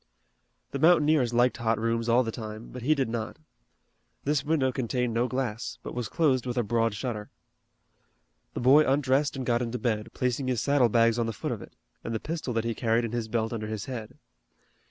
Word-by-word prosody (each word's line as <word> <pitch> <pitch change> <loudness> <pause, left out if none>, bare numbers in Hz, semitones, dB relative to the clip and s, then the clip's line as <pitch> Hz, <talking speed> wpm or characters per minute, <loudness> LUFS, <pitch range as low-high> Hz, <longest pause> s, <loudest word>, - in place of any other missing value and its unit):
The 140 - -3
mountaineers 155 -5 +4
liked 120 +1 +3
hot 115 -2 +1
rooms 115 +1 -1
all 120 +2 +5
the 115 - -3
time, 110 0 -7
but 125 - -7
he 150 +6 +3
did 135 -3 0
not. 115 -1 -4 0.9
This 145 -1 +1
window 145 -3 +1
contained 125 -1 -1
no 120 +2 +1
glass, 125 -4 -3
but - - -6
was 120 -3 -3
closed 130 -7 +1
with 125 0 -3
a 120 - +2
broad 115 0 +1
shutter. 105 -2 -4 1.3
The - - -2
boy 135 +5 +7
undressed 140 0 +2
and 130 -1 -4
got 120 -1 +1
into 120 0 -2
bed, 110 -3 -1
placing 125 +1 -1
his 125 -3 0
saddle 140 -2 +3
bags 115 +1 +3
on 115 - +1
the 115 - -3
foot - - -4
of - - -4
it, - - -13 0.3
and 115 - -3
the - - -1
pistol 155 -2 -4
that 115 - +1
he 115 - 0
carried 115 +1 +1
in 115 - -4
his 120 -2 -2
belt 110 0 -1
under 110 -2 -4
his 110 -2 -4
head. 120 -5 -7
120 Hz, 210 wpm, -27 LUFS, 115-130 Hz, 1.3 s, boy